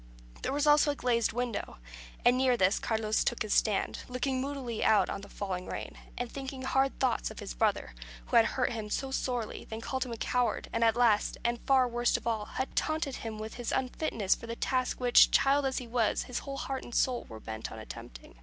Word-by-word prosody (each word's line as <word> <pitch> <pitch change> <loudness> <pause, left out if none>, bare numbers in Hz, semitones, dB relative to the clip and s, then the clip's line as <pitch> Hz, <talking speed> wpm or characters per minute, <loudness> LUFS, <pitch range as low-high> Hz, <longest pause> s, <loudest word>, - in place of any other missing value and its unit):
There - - -2
was 290 +2 +1
also 295 0 +5
a 290 - 0
glazed 235 -4 +1
window, 245 -2 -3 0.5
and 245 +1 +6
near 255 -1 +3
this 190 0 +3
Carlos 220 -1 0
took 240 - 0
his 215 - -1
stand, 210 -3 +1
looking 255 +1 -1
moodily 265 -5 -3
out 210 -4 +4
on - - -4
the 200 - -11
falling 185 -3 -4
rain, - - -5 0.2
and 245 - -2
thinking 270 -1 -6
hard 270 +1 +1
thoughts - - +1
of - - -11
his - - -6
brother, - - 0 0.3
who - - -3
had 225 - +7
first - - -5
hurt - - +1
him 220 -3 -4
so 270 +5 -2
sorely, 245 -4 -2
then 220 - -6
called 260 +3 -2
him 235 -3 -6
coward, 250 +2 0
and 230 - +1
last, 230 -4 +3
and 235 0 0
far 265 -2 +5
worst 240 0 +1
of - - -11
all, 220 -3 -1
had 260 +4 -4
taunted 310 -4 0
him 225 -1 -6
with 215 +1 -6
his 240 -2 -3
unfitness 250 -6 0
for 230 - -8
the 230 - -4
task 255 +1 -1
which, 245 -1 +6
child 275 0 +3
as 265 - -2
he 250 - -3
was, 230 -2 +1
his 250 - -4
whole 275 -1 -6
heart 270 -1 -3
and 240 - -8
soul 250 -2 +1
were 110 - -8
bent 110 0 -6
on - - -8
attempting. - - -10
240 Hz, 220 wpm, -30 LUFS, 220-265 Hz, 0.5 s, had